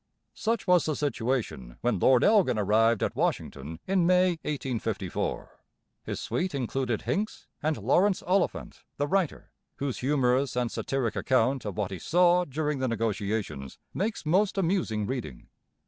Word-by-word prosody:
Such 230 Hz, +1 st, -1 dB
was 180 Hz, -2 st, +4 dB
the 155 Hz, -, 0 dB
situation 115 Hz, -, -2 dB
when 120 Hz, -5 st, +1 dB
Lord 125 Hz, +5 st, +5 dB
Elgin 190 Hz, -, +4 dB
arrived 110 Hz, +2 st, +3 dB
at -, -, -1 dB
Washington 75 Hz, +4 st, -2 dB
in 185 Hz, -3 st, +2 dB
May 185 Hz, 0 st, +5 dB
1854. 115 Hz, -, -3 dB, 0.4 s
His -, -, -4 dB
suite 180 Hz, -4 st, -2 dB
included 130 Hz, -3 st, -2 dB
Hincks 210 Hz, +2 st, -2 dB, 0.2 s
and 155 Hz, 0 st, 0 dB
Laurence 180 Hz, -, +2 dB
Oliphant, 185 Hz, +1 st, -1 dB
the 145 Hz, -, +1 dB
writer, 185 Hz, 0 st, -1 dB, 0.2 s
whose 140 Hz, -3 st, -3 dB
humorous 130 Hz, -1 st, +1 dB
and 125 Hz, -2 st, 0 dB
satiric 130 Hz, -5 st, -2 dB
account 130 Hz, 0 st, +1 dB
of 100 Hz, -3 st, -5 dB
what 100 Hz, -3 st, -1 dB
he 95 Hz, -, -5 dB
saw 175 Hz, -, +3 dB
during 150 Hz, 0 st, -2 dB
the 130 Hz, -, 0 dB
negotiations 105 Hz, -, -2 dB, 0.2 s
makes 205 Hz, -2 st, -2 dB
most 190 Hz, +6 st, +2 dB
amusing 165 Hz, -, 0 dB
reading. 110 Hz, -, -5 dB
130 Hz, 145 wpm, -28 LUFS, 110-175 Hz, 0.4 s, Lord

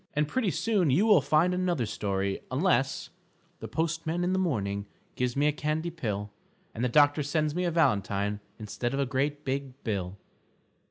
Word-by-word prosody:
And 150 Hz, 0 st, +2 dB
pretty 225 Hz, -, 0 dB
soon 195 Hz, -3 st, +1 dB
you 165 Hz, +11 st, +4 dB
will 205 Hz, -8 st, +6 dB
find 155 Hz, +6 st, +3 dB
another 180 Hz, -8 st, 0 dB
story 100 Hz, -2 st, -2 dB
unless 135 Hz, -2 st, +1 dB, 0.5 s
_The -, -, -7 dB
postman 165 Hz, +1 st, -1 dB
in 180 Hz, +1 st, +1 dB
the 190 Hz, -, +1 dB
morning 100 Hz, -, -1 dB, 0.3 s
Gives 125 Hz, -1 st, -1 dB
me 145 Hz, +1 st, +2 dB
a 150 Hz, -, +4 dB
candy 155 Hz, +3 st, -2 dB
pill, 105 Hz, -10 st, -4 dB, 0.4 s
And 115 Hz, -, -4 dB
the 125 Hz, -, +2 dB
doctor 145 Hz, +3 st, +4 dB
sends 150 Hz, +1 st, 0 dB
me 180 Hz, +2 st, -1 dB
a -, -, +2 dB
valentine 105 Hz, -, +1 dB, 0.2 s
Instead 120 Hz, +4 st, -3 dB
of -, -, -2 dB
a 140 Hz, -, +2 dB
great 145 Hz, +3 st, -1 dB
big 135 Hz, 0 st, -4 dB
bill. 100 Hz, -4 st, -3 dB
145 Hz, 175 wpm, -28 LUFS, 115-165 Hz, 0.5 s, will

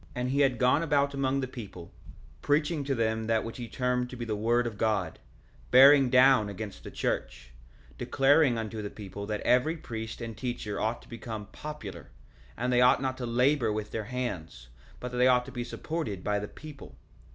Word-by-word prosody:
1:3 -, -, -24 dB
And 125 Hz, 0 st, -2 dB
he 140 Hz, -, 0 dB
had 130 Hz, -3 st, +3 dB
gone 125 Hz, +5 st, +3 dB
about 140 Hz, -3 st, +1 dB
among 135 Hz, 0 st, 0 dB
the 130 Hz, -, -2 dB
people, 105 Hz, -9 st, -10 dB, 0.5 s
preaching 150 Hz, +1 st, +1 dB
to 135 Hz, -1 st, 0 dB
them 110 Hz, -1 st, -1 dB
that 115 Hz, -1 st, +1 dB
which 115 Hz, -, -7 dB
he 120 Hz, -2 st, -6 dB
termed 125 Hz, +1 st, -1 dB
to 125 Hz, -, -8 dB
be 120 Hz, -1 st, -5 dB
the 110 Hz, -2 st, -2 dB
word 120 Hz, +3 st, +1 dB
of 110 Hz, -3 st, -5 dB
God, 100 Hz, -7 st, 0 dB, 0.5 s
bearing 135 Hz, +1 st, +7 dB
down 130 Hz, -4 st, +5 dB
against 100 Hz, 0 st, -7 dB
the -, -, -7 dB
church; -, -, -3 dB, 0.5 s
declaring 135 Hz, -2 st, +3 dB
unto 110 Hz, -1 st, -4 dB
the 100 Hz, -, -5 dB
people 100 Hz, -1 st, -8 dB
that 105 Hz, -1 st, -3 dB
every 140 Hz, +7 st, +2 dB
priest 110 Hz, -6 st, -6 dB
and 115 Hz, -2 st, -6 dB
teacher 110 Hz, -3 st, -4 dB
ought 110 Hz, +2 st, -2 dB
to -, -, -19 dB
become 115 Hz, -3 st, -7 dB
popular; 150 Hz, 0 st, -8 dB, 0.5 s
and 125 Hz, +2 st, -1 dB
they 125 Hz, -, +4 dB
ought 125 Hz, 0 st, +5 dB
not 130 Hz, -1 st, -2 dB
to 125 Hz, -, -3 dB
labor 125 Hz, +1 st, +2 dB
with 105 Hz, 0 st, -4 dB
their 110 Hz, -2 st, -3 dB
hands, 90 Hz, -, -5 dB, 0.3 s
but 125 Hz, -, -6 dB
that 125 Hz, -, -3 dB
they 125 Hz, -, +5 dB
ought 125 Hz, -1 st, +4 dB
to 135 Hz, -, -9 dB
be 120 Hz, -1 st, -4 dB
supported 120 Hz, -, -4 dB
by 105 Hz, 0 st, 0 dB
the 105 Hz, -, -5 dB
people. 145 Hz, -, -12 dB
120 Hz, 205 wpm, -29 LUFS, 110-130 Hz, 0.5 s, bearing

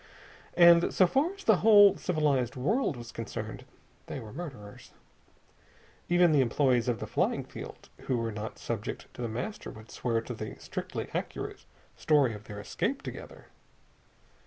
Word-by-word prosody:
And 170 Hz, -1 st, +7 dB
so 185 Hz, -, +5 dB
far 275 Hz, -, +1 dB
as 395 Hz, -, -13 dB
the 220 Hz, -4 st, +5 dB
whole 205 Hz, -2 st, +7 dB
civilized 145 Hz, -8 st, 0 dB
world 160 Hz, -, 0 dB
was 120 Hz, 0 st, -9 dB
concerned 115 Hz, -2 st, -6 dB, 0.4 s
they -, -, -5 dB
were 110 Hz, -2 st, -10 dB
murderers. 130 Hz, -11 st, -9 dB, 1.2 s
Even 175 Hz, -1 st, +5 dB
the 145 Hz, -3 st, +5 dB
employees 125 Hz, -1 st, +2 dB
of 120 Hz, -2 st, 0 dB
the -, -, -4 dB
flying -, -, 0 dB
field -, -, -10 dB
who 130 Hz, -, -1 dB
were 115 Hz, -1 st, -2 dB
not 110 Hz, +3 st, -6 dB
subject 115 Hz, -1 st, -5 dB
to -, -, -9 dB
The 120 Hz, -, -1 dB
Master 125 Hz, -, -5 dB
would 110 Hz, 0 st, -12 dB
swear 115 Hz, -2 st, -1 dB
to 120 Hz, -, -6 dB
the 110 Hz, -1 st, -6 dB
strictly -, -, -5 dB
accurate -, -, -5 dB, 0.3 s
story 145 Hz, -6 st, +3 dB
of 105 Hz, +1 st, -10 dB
their 105 Hz, -1 st, -8 dB
escape 100 Hz, -, -2 dB
together. -, -, -9 dB
130 Hz, 160 wpm, -29 LUFS, 115-175 Hz, 1.2 s, And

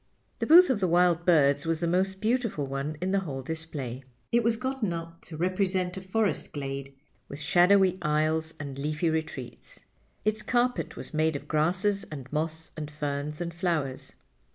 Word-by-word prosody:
The -, -, -1 dB
booth 350 Hz, 0 st, +8 dB
of 235 Hz, -, 0 dB
the 185 Hz, -, +1 dB
wild 175 Hz, 0 st, +3 dB
birds 145 Hz, -3 st, +4 dB
was 165 Hz, -1 st, 0 dB
the 170 Hz, -, -1 dB
most 190 Hz, +3 st, 0 dB
beautiful 225 Hz, -, 0 dB
one 135 Hz, +3 st, -4 dB
in 185 Hz, +1 st, 0 dB
the 195 Hz, -, +3 dB
whole 140 Hz, -8 st, -5 dB
display. 145 Hz, -5 st, -4 dB, 0.3 s
It 235 Hz, 0 st, +3 dB
was 230 Hz, 0 st, +2 dB
gotten 255 Hz, -4 st, -2 dB
up 165 Hz, 0 st, -7 dB
to 160 Hz, -, -8 dB
represent 185 Hz, +1 st, 0 dB
a 190 Hz, -, -6 dB
forest 205 Hz, +3 st, -1 dB
glade, 140 Hz, -1 st, -5 dB, 0.3 s
with 140 Hz, -, -8 dB
shadowy 185 Hz, +2 st, +4 dB
aisles 155 Hz, +1 st, 0 dB
and 140 Hz, -2 st, -6 dB
leafy 155 Hz, +3 st, 0 dB
retreats. 150 Hz, -6 st, -5 dB, 0.4 s
Its 215 Hz, 0 st, +1 dB
carpet 245 Hz, +3 st, 0 dB
was -, -, -9 dB
made 155 Hz, 0 st, +1 dB
of 140 Hz, -, -6 dB
grasses 185 Hz, +6 st, +1 dB
and 140 Hz, -2 st, -9 dB
moss 160 Hz, +1 st, -2 dB
and 150 Hz, -2 st, -5 dB
ferns 150 Hz, +1 st, -4 dB
and 170 Hz, -1 st, -3 dB
flowers. 165 Hz, -7 st, -2 dB
165 Hz, 175 wpm, -28 LUFS, 150-190 Hz, 0.4 s, booth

